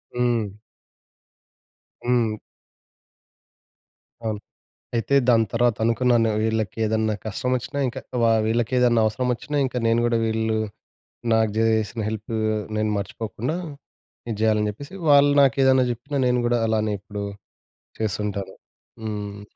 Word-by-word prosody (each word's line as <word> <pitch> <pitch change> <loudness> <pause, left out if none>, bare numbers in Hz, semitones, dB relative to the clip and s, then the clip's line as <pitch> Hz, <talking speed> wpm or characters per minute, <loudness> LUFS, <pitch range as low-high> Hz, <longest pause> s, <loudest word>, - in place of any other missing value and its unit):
హ్మ్. 120 -5 0 1.5
హ్మ్. 120 -3 +2 1.9
అవును. 110 -2 -2 0.6
అయితే, 115 +4 0
దాని 115 -2 +5
తర్వాత 120 -1 +2
అనుకున్నాను, 115 -1 +3
వీళ్ళకేదన్నా 110 0 0
కష్టమొచ్చినా, 125 +6 -2
ఇంక 125 +1 -4 0.3
వా 115 - +5 0.2
వీళ్ళకేదన్నా 120 +1 +2
అవసరమొచ్చినా, 125 +5 -2
ఇంక 130 - -8
నేను 115 +1 +3
గూడా 120 -1 +2
వీళ్ళూ 110 0 0 0.8
నాకు 110 -1 +3
జేసిన 110 0 +1
హెల్పూ 110 +1 -5 0.4
నేను 110 0 0
మర్చిపోకుండా 110 +7 -4 0.7
ఇది 115 - -2
జెయ్యాలని 110 -1 +2
జెప్పేసి, 140 - -9 0.2
వాళ్ళు 145 0 +7
నాకేదన్నా 130 -1 +4
చెప్పినా 135 +5 -4
నేను 125 0 +2
గూడా 120 0 +2
అలానే 110 -1 +1
ఇప్పుడు 100 +1 -6 0.8
చేస్తుంటాను. 100 -2 -2 0.5
హ్మ్. 105 -2 -5
115 Hz, 105 wpm, -23 LUFS, 110-125 Hz, 1.9 s, వాళ్ళు